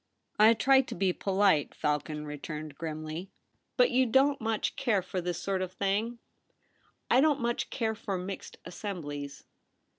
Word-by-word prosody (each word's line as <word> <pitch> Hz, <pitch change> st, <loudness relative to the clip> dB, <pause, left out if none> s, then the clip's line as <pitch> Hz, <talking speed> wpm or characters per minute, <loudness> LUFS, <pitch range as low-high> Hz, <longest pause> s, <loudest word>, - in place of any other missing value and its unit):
' -, -, -43 dB
I 230 Hz, -, +5 dB
try 265 Hz, +4 st, +5 dB
to 265 Hz, -, -7 dB
be 185 Hz, 0 st, +1 dB
polite,' 190 Hz, -7 st, +2 dB
Falcon 150 Hz, +1 st, -2 dB
returned 150 Hz, +1 st, -6 dB
grimly, 155 Hz, +3 st, -5 dB, 0.2 s
' -, -, -47 dB
But -, -, +5 dB
you 255 Hz, 0 st, +3 dB
don't 270 Hz, +3 st, +3 dB
much 220 Hz, -1 st, -1 dB
care 220 Hz, -8 st, +1 dB
for 185 Hz, 0 st, -3 dB
this 175 Hz, -1 st, -3 dB
sort 190 Hz, +1 st, -1 dB
of 185 Hz, -1 st, -4 dB
thing 205 Hz, +5 st, -1 dB, 0.3 s
?' -, -, -42 dB
' -, -, -17 dB
I 255 Hz, -, +6 dB
don't 295 Hz, -1 st, +3 dB
much 235 Hz, -1 st, -1 dB
care 225 Hz, -3 st, -1 dB
for 210 Hz, -3 st, -4 dB
mixed 185 Hz, +2 st, -6 dB
assemblies.' 150 Hz, -6 st, -6 dB
195 Hz, 175 wpm, -30 LUFS, 155-230 Hz, 0.3 s, I